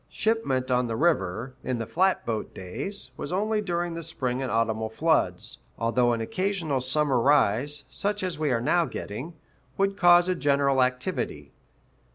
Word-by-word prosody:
Shipment 135 - 0
on 125 0 +2
the 115 - -2
river, 125 - 0
in 125 - -1
the 115 - -3
flatboat 120 - 0
days, 145 - -5
was - - -5
only 210 +3 0
during 175 -3 -2
the 165 - -5
spring 130 -6 -3
and 130 - -2
autumnal 110 -1 0
floods; 110 - 0 0.2
although 120 +2 +2
an 115 -1 -1
occasional 170 - -1
summer 135 0 +2
rise, 140 +2 +2
such 205 0 -2
as 180 -4 -3
we 155 -2 +1
are 120 -3 +1
now 170 +7 +2
getting, 135 +10 -6 0.4
would 195 0 +1
cause 175 -1 +6
a 185 - +2
general 140 -4 +2
activity. 125 0 -2
140 Hz, 160 wpm, -26 LUFS, 120-175 Hz, 0.4 s, cause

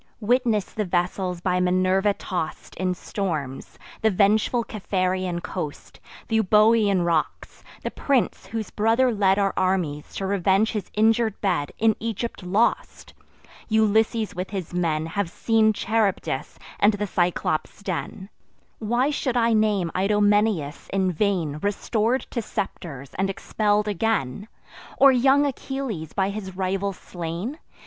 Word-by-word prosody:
Witness 230 -2 +2
the 215 - -1
vessels 180 0 -1
by 180 0 +1
Minerva 185 +2 +2
toss'd 175 -5 -5
In 185 -1 0
storms; 155 -10 -4 0.2
the 220 - +4
vengeful 215 +4 +2
Capharean 185 -4 -2
coast; 160 -6 -6 0.3
Th' - - -21
Euboean 210 -2 +4
rocks! 165 -2 -2 0.2
the - - -3
prince, 260 -8 0
whose 220 +1 -4
brother 230 +4 +2
led 195 -2 +3
Our 200 -1 +1
armies 180 -6 -1
to 195 - -3
revenge 195 +2 +2
his 210 -4 -4
injur'd 220 0 +2
bed, 175 -8 0
In 220 -1 +3
Egypt 230 0 -4
lost! 195 +5 0 0.6
Ulysses 220 0 +2
with 180 +1 -4
his 190 -4 -5
men 160 -3 0
Have 175 +2 -2
seen 220 +3 +2
Charybdis 215 -1 -1 0.2
and 205 +2 +5
the 205 0 -2
Cyclops' 175 0 -1
den. 190 +1 -4 0.5
Why 240 +6 +1
should 260 -4 -1
I 230 -1 +3
name 210 -6 +2
Idomeneus, 205 -5 +1
in 190 -1 +1
vain 170 -5 0
Restor'd 220 +6 0
to 235 - -2
scepters, 140 - -5
and 195 0 +1
expell'd 210 +2 0
again? 205 - -1 0.5
Or 275 0 +7
young 270 +3 +4
Achilles, 265 - -4
by 195 -1 +1
his 190 -3 -7
rival 195 +1 -1
slain? 180 - -6
200 Hz, 130 wpm, -24 LUFS, 180-220 Hz, 0.6 s, Or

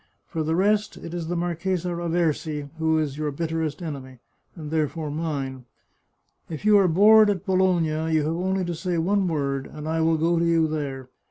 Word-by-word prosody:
For 160 - -3
the 160 +1 0
rest, 210 +3 +1
it 165 - -8
is 170 -2 -4
the 175 - -2
Marchesa 175 +1 -1
Raversi 165 -3 -1
who 160 0 +2
is 150 -2 -2
your 155 -1 -1
bitterest 160 +1 -3
enemy, 135 -5 -7 0.4
and 155 -3 -8
therefore 155 -1 -1
mine. 140 -5 -4 0.8
If 160 +4 -7
you 210 -1 +6
arc 180 -5 +2
bored 215 +2 +7
at 195 -2 -2
Bologna, 170 -5 +1
you 155 -1 +2
have 160 +2 -1
only 190 +1 -1
to 175 - -3
say 175 +1 -2
one 190 +3 +1
word, 140 -4 -2
and 150 0 -8
I 160 0 0
will 160 0 +3
go 165 +2 +2
to - - +1
you 165 -1 +3
there. 140 -4 -4
160 Hz, 190 wpm, -24 LUFS, 155-175 Hz, 0.8 s, bored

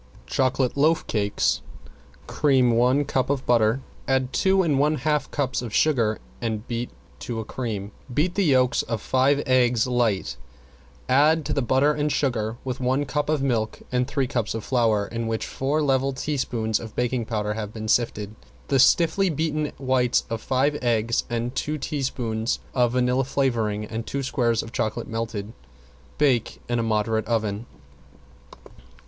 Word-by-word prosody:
~CHOCOLATE 130 -1 0
LOAF 155 +3 +2
CAKES~ 105 -2 0 0.6
Cream 130 -4 +3
one 125 +5 +3
cup 130 -1 0
of 140 -2 -1
butter, 115 +1 +3 0.3
add 130 -1 +1
two 190 0 +3
and 150 -5 +1
one 150 +2 +3
half 150 -1 0
cups 135 -4 -1
of 120 -3 -6
sugar 120 -8 +2 0.2
and 110 -1 -3
beat 120 0 -3 0.3
to 115 -2 -4
a 110 - -4
cream. 105 -5 -4 0.2
Beat 160 +8 +1
the 200 0 +1
yolks 130 -4 +3
of 115 -1 -3
five 135 +5 +2
eggs 125 -3 +3
light, 110 - 0 0.7
add 150 +4 +4
to 150 - -1
the 140 - +1
butter 135 +4 +3
and 150 0 -1
sugar, 115 -6 -1
with 130 -2 -4
one 130 +3 +1
cup 150 +2 -2
of 155 -3 +1
milk 115 -5 -1
and 125 0 +1
three 135 -1 0
cups 120 -3 -2
of 115 - -4
flour 115 -5 +2
in 115 +1 -4
which 110 0 -2
four 145 +3 -1
level 135 -1 +1
teaspoons 120 -6 -1
of 110 -2 -9
baking 125 -1 0
powder 105 -2 -2
have 105 -1 -5
been 110 0 -6
sifted, 105 -3 0 0.4
the 135 - +3
stiffly 175 +7 +4
beaten 155 -1 -1
whites 130 -2 +1
of 115 - -2
five 140 +3 +1
eggs 115 -2 +1
and 120 +1 -2
two 150 +3 -2
teaspoons 125 -6 -2 0.2
of 120 -2 +2
vanilla 125 +1 +2
flavoring 115 -6 0
and 115 +1 -5
two 140 0 -3
squares 120 -4 +1
of 115 - -10
chocolate 110 -3 -2
melted. 115 -2 -4 0.6
Bake 135 -6 +1
in 120 0 0
a - - +2
moderate 110 0 0
oven. 110 -1 -1
125 Hz, 165 wpm, -24 LUFS, 115-140 Hz, 0.7 s, add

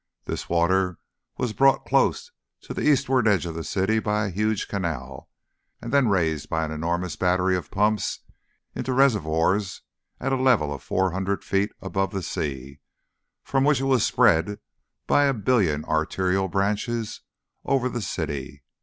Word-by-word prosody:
This - - -5
water 90 +1 +2 0.4
was 125 -4 -2
brought 135 +3 +3
close 485 0 +1 0.3
to - - -7
the - - -4
eastward 135 -4 +3
edge 100 -5 +3
of 85 - -4
the 80 0 -5
city 100 +6 0
by 105 0 0
a - - -2
huge 105 +2 -1
canal, 70 -9 -4 0.5
and 120 +3 -7
then 140 -3 +4
raised 80 -7 0
by 80 0 0
an 80 - -6
enormous 85 +1 -2
battery 90 +1 +2
of 90 -5 -4
pumps 105 +1 0 0.5
into 130 - -3
reservoirs 100 - +1 0.4
at 135 +1 -1
a 130 - 0
level 115 - +3
of 70 - -8
four 95 0 0
hundred 95 +2 -2
feet 100 +2 0
above 95 -1 -1
the 95 -2 -3
sea, 70 -3 -4 0.6
from 135 -1 +1
which 145 -2 +3
it 135 -1 +2
spread 95 0 +3 0.5
by 145 - +4
a 140 -1 +2
billion 100 -10 +1
arterial 95 +4 0
branches 105 +4 -2 0.4
over 135 -2 +1
the 120 -2 -4
city. 70 -7 -4
95 Hz, 155 wpm, -24 LUFS, 85-115 Hz, 0.6 s, then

